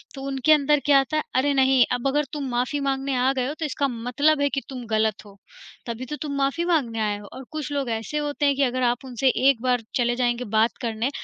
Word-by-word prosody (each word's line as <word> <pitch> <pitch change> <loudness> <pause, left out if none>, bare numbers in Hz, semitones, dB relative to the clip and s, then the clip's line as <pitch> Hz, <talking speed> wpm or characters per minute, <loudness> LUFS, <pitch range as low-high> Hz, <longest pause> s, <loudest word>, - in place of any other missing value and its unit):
तो 270 - -7
उनके 270 +2 +1
अंदर 295 0 +3
क्या 280 -2 +6
आता 305 +3 -1
है 305 - 0
अरे 280 +2 +2
नहीं 265 -2 +4
अब 245 +2 0
अगर 295 +2 +1
तुम 290 -2 -3
माफ़ी 250 +4 -1
माँगने 275 0 -1
आ 255 +2 +3
गए 255 -1 -1
हो 290 - -3
तो 320 - -1
इसका 280 -1 -1
मतलब 265 +5 +1
है 285 - +2
कि 275 +1 -2
तुम 250 -3 -7
ग़लत 220 -1 0
हो, 200 -1 -15 0.5
तभी 235 +1 -5
तो 300 - -5
तुम 285 -2 -3
माफ़ी 275 +5 0
माँगने 275 -10 0
आए 210 -1 0
हो। 205 - -12
और 265 - -8
कुछ 305 -2 -5
लोग 280 -3 -2
ऐसे 225 +6 -3
होते 295 0 -1
हैं 280 - +3
कि 275 - +1
अगर 255 0 0
आप 245 +2 0
उनसे 260 +1 +1 0.2
एक 255 -5 +1
बार 250 -1 +1
चले 240 -1 +1
जाएँगे 240 0 0
बात 225 +2 +2
करने 230 +2 -1
265 Hz, 250 wpm, -24 LUFS, 240-285 Hz, 0.5 s, क्या